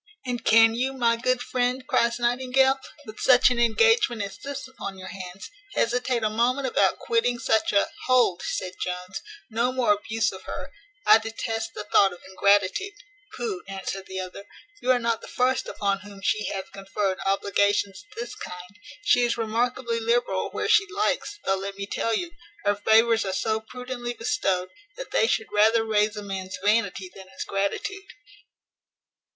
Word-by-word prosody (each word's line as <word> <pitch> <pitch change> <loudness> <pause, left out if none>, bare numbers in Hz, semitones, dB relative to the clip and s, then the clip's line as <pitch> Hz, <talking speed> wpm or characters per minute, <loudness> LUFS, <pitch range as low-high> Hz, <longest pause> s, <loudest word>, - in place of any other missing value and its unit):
"And 245 -2 -3
can 225 0 +6
you, 255 +3 -1
my 235 -3 +2
good 250 +1 0
friend," 250 +1 -1
cries 235 -4 +2
Nightingale, 260 +2 +2 0.3
"with 215 -2 -10
such 255 0 +6
an 245 - 0
engagement 240 - +3
as 200 - -6
this 280 -1 -6
upon 200 -7 -7
your 185 0 -8
hands, 185 0 -8 0.2
hesitate 245 0 +1
a 215 - +2
moment 250 +5 +1
about 260 - +2
quitting 460 - +1
such 225 -1 +1
a 200 - +3
" - - -11
"Hold," 250 -8 +3
said 185 -1 -3
Jones, 180 +1 -5 0.3
"no 235 +3 +1
more 250 -5 +3
abuse 215 +2 -1
of 190 - -10
her: - - -6 0.3
I - - +8
detest 225 0 -4
the - - -5
thought 195 -2 +4
of 175 - -13
ingratitude." 200 - +2 0.4
"Pooh!" 420 -7 -3
answered 195 0 -5
the 190 0 -5
other, 185 +2 -7 0.4
"you 255 - -3
are 255 - +6
not 230 -1 -1
the - - -10
first 255 +1 0
upon 200 -1 -1
whom 200 0 -12
she 215 +1 +1
hath 190 -3 -5
conferred 195 0 -2
obligations 200 0 +1
of - - -18
this 240 - -5
kind. 180 +4 -9 0.2
She 245 - +4
is 240 -1 +1
remarkably 235 +1 -1
liberal 230 -4 0
where - - -3
she 415 -3 +4
likes; 410 +2 -1
though, 195 - +2
let 195 +1 -6
me 200 - -4
tell 225 +2 -1
you, 345 +8 -3 0.3
her 205 - +4
favours 225 +2 +4
are 190 - -3
so 220 +3 0
prudently 245 +1 -6
bestowed, 195 -8 -1 0.3
that - - -7
they 220 - +3
should 220 - -1
rather 220 +2 +4
raise 210 -1 +1
a 210 - -5
man's 190 -1 -5
vanity 205 -3 +1
than 190 -1 -12
his - - -6
gratitude." 285 - -3
225 Hz, 175 wpm, -25 LUFS, 200-250 Hz, 0.4 s, I